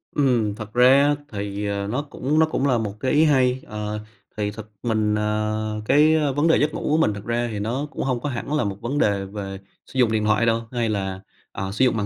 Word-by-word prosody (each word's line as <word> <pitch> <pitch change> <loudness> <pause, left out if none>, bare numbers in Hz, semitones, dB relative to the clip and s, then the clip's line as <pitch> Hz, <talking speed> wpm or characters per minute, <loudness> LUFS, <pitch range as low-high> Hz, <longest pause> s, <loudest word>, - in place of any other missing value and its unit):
Ừm, 120 -7 +2
thật 110 -1 -8
ra 130 +3 +6
á 145 - +3 0.2
thì, 100 0 -4
ờ, 100 0 -2
nó 125 +7 -1
cũng 145 +1 -1
nó 160 - +6
cũng 140 -3 -1
là 125 - +3
một 105 -3 -3
cái 130 - 0
ý 150 +2 +5
hay. 130 -3 +3
Ờ, 105 0 -4 0.4
thì 105 -1 -1
thật 110 0 -9 0.2
mình 110 -3 +1
à, 105 0 -1 0.2
cái 150 +6 +5 0.2
vấn 145 +3 +2
đề 165 - +5
giấc 150 +1 +1
ngủ - - -4
của 155 - +3
mình, 160 -10 +2
thật 100 0 -8
ra 120 +1 0
thì 105 - -4
nó 125 +8 -2
cũng - - -4
hông 130 -2 0
có 145 - -3
hẳn 130 +3 -4
là 150 - +2
một 100 -1 -3
vấn 130 +5 -2
đề 100 -7 +1
về 95 -1 -6 0.3
sử 130 - -6
dụng 115 -3 +4
điện 110 -1 +1
thoại 110 +2 +3
đâu, 115 0 +2
hay 120 -2 -1
là, 95 -2 -2 0.3
à, 95 0 -4
sử 120 +6 +2
dụng 120 -3 +2
màn 105 - -1
115 Hz, 255 wpm, -23 LUFS, 105-135 Hz, 0.4 s, ra